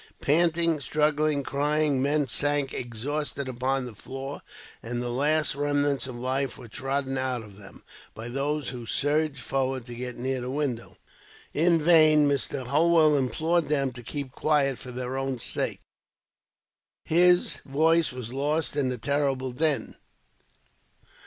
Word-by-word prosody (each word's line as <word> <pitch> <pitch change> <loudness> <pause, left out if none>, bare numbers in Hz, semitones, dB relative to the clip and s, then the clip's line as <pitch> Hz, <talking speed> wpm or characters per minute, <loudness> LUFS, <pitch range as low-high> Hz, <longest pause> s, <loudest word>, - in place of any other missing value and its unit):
Panting, 165 +1 +2
struggling, 150 0 +1
crying, 145 0 +1
men 145 +1 +1
sank 145 +2 +1
exhausted 140 +4 -4
upon 130 +1 -1
the 120 - -8
floor, 135 +6 -7 0.4
and 120 +1 -4
the 120 0 -3
last 150 +4 +1
remnants 145 -2 0
of 130 - -7
life 130 +2 -2
were 125 - -11
trodden 135 +2 -2
out 130 -3 -2
of 100 -2 -14
them, 100 -1 -14 0.3
by 110 +1 -7
those 140 +3 -2
who 120 -3 -7
surged 145 +1 +1
forward 130 -1 -2
to 120 - -9
get 125 +1 -6
near 130 +1 -2
the 125 - -4
window. 135 -4 -3 0.6
In 165 +2 +3
vain, 155 -2 +5
Mr. 140 -1 -1
Holwell 155 +2 +4
implored 155 +6 +1
them 140 -3 +1
to 120 0 -10
keep 140 +2 -5
quiet, 140 -2 +1
for 125 - -9
their 125 +1 -4
own 135 -1 -2
sakes. - - -2 1.2
His 175 +2 +4
voice 160 +3 +2
was 125 -2 -7
lost 145 +1 -1
in 140 -3 +1
the 125 - -3
terrible 135 +1 -1
din. 150 +3 0
140 Hz, 145 wpm, -26 LUFS, 130-150 Hz, 1.2 s, vain